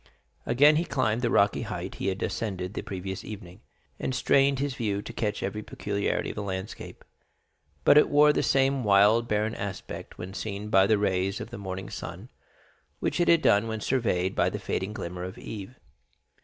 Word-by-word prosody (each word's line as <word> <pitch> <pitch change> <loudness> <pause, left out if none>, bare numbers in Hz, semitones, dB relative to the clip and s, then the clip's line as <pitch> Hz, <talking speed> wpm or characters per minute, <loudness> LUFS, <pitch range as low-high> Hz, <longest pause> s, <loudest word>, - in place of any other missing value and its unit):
Again 145 +4 +5
he 165 - +2
climbed 125 -8 0
the 120 - +1
rocky 100 -2 +3
height 95 -5 -5
he - - -1
had 95 0 -1
ascended 95 -4 -3
the - - -3
previous 95 0 -5
evening, 100 -2 -9 0.4
and 130 - -2
strained 135 +1 +3
his 140 0 -1
view 105 -5 -2
to 115 - -8
catch 105 -3 -2
every 105 +2 -3
peculiarity 100 -1 -2
of - - -12
the 105 - -3
landscape; 95 0 -6 0.8
but 150 - +7
it - - +3
wore 150 +1 +6
the - - +1
same 135 -1 +2
wild, 105 +3 +5
barren 105 +1 0
aspect 100 -2 -6
when 95 +2 -7
seen 105 0 -5
by 95 -2 +5
the 110 - +4
rays 95 -1 0
of - - -7
the - - -7
morning 95 -1 -6
sun - - -7 0.7
which - - -1
it 175 - +2
had 165 -1 +5
done 105 +3 +4
when 110 -1 -3
surveyed 105 -7 0
by - - +2
the - - -4
fading 95 +2 -3
glimmer 90 -3 -5
of 95 +1 -7
eve. 110 +4 -8
105 Hz, 190 wpm, -27 LUFS, 95-120 Hz, 0.8 s, but